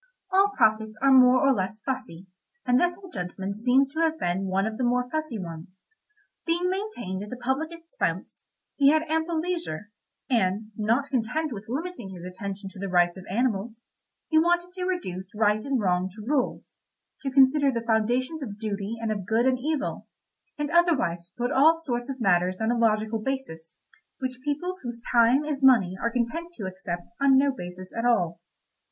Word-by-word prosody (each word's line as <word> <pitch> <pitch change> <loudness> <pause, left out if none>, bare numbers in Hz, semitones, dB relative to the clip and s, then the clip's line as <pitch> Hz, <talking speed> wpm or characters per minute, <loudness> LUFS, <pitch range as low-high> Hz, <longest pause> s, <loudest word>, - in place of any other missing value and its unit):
All 395 +2 +4
prophets 220 -2 +2
are 275 +1 +4
more 255 -1 +7
or 275 - +5
less 200 0 -3
fussy, 190 -9 -4 0.4
and 250 0 +3
this 350 0 +1
old 380 -2 -13
gentleman 190 +1 -4
seems 255 +6 +2
to 315 - -3
have 320 -1 +2
been 190 - -1
one 190 +1 +1
of 220 0 -3
the - - 0
more 250 +1 +1
fussy 310 -6 -2
ones. 175 0 -9 0.6
Being 345 +2 0
maintained 370 - -4
at 205 - -7
the 250 - -6
public 265 +6 -1
expense, 335 +6 -4 0.3
he 280 -1 +6
had 315 +1 +3
ample 320 +1 -1
leisure, 320 - -4 0.4
and 215 -4 +1
not 230 +7 0
content 265 +4 -1
with 205 -1 -8
limiting 315 - -4
his 180 -2 -9
attention 195 +2 -6
to 195 - -12
the 195 0 -3
rights 175 -1 +3
of 190 0 -10
animals, 230 +1 -1 0.4
he 315 - +4
wanted 345 +2 +2
to 365 0 -4
reduce 195 - -4
right 210 0 +2
and 275 -2 0
wrong 185 -2 +1
to 215 -1 -9
rules, 270 0 -2 0.4
to 275 - -2
consider 275 +1 +5
the 230 -2 -3
foundations 245 +7 +1
of 210 -7 -6
duty 210 0 -4
and 225 -1 -2
of 200 -4 -4
good 230 +2 +2
and 260 -1 +2
evil, 295 +2 -2 0.5
and 295 -1 -2
otherwise 295 - +2
to 180 - -36
put 245 +1 -1
all 320 +4 +5
sorts 245 -5 -3
of 265 -1 -5
matters 185 -3 +2
on 220 +1 +1
a - - +1
logical 220 -1 +1
basis, 215 -11 -5 0.4
which 255 -1 -5
people 300 +6 -2
whose 240 -2 -6
time 245 +4 +4
is 295 -2 -3
money 225 -9 +5
are 235 - +1
content 255 +9 -2
to 215 - -6
accept 185 -1 -6
on 275 -1 +6
no 280 +1 +4
basis 180 -2 -9
at 230 - -2
all. 175 -9 +1
240 Hz, 185 wpm, -26 LUFS, 200-290 Hz, 0.6 s, more